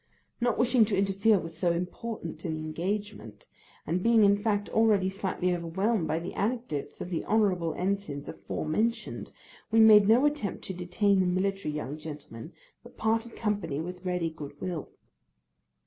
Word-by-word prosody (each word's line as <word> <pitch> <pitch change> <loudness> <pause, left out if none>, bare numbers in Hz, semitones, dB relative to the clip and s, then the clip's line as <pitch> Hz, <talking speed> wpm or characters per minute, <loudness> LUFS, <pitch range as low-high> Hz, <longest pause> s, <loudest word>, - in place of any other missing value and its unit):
Not 240 -2 +1
wishing 245 -1 +4
to 200 -2 -1
interfere 195 +2 +3
with 165 -2 -6
so 175 +1 +1
important 180 -1 -5
an 160 -3 -2
engagement, 195 - -4 0.4
and 180 +2 -1
being 230 +1 +5
in 200 0 +6
fact 205 0 -1
already 210 -4 +3
slightly 190 -2 -1
overwhelmed 175 +3 0
by 160 - 0
the 170 +2 -5
anecdotes 215 - -3
of 180 - -5
the 170 - -1
honourable 190 -7 +2
ensigns 185 -7 -2
afore - - -5
mentioned, 220 +10 -1 0.4
we 225 +1 +3
made 215 -2 +8
no 235 +6 +5
attempt 295 -8 -1
to 190 - -4
detain 185 +3 +1
the 185 - +2
military 185 -3 -1
young 150 0 -4
gentleman, 150 -3 -9 0.3
but 240 - -16
parted 225 +1 0
company 200 -10 -2
with 180 +2 -6
ready 180 -3 -1
good 145 -2 -9
will. 175 -5 -4
190 Hz, 160 wpm, -28 LUFS, 165-215 Hz, 0.4 s, made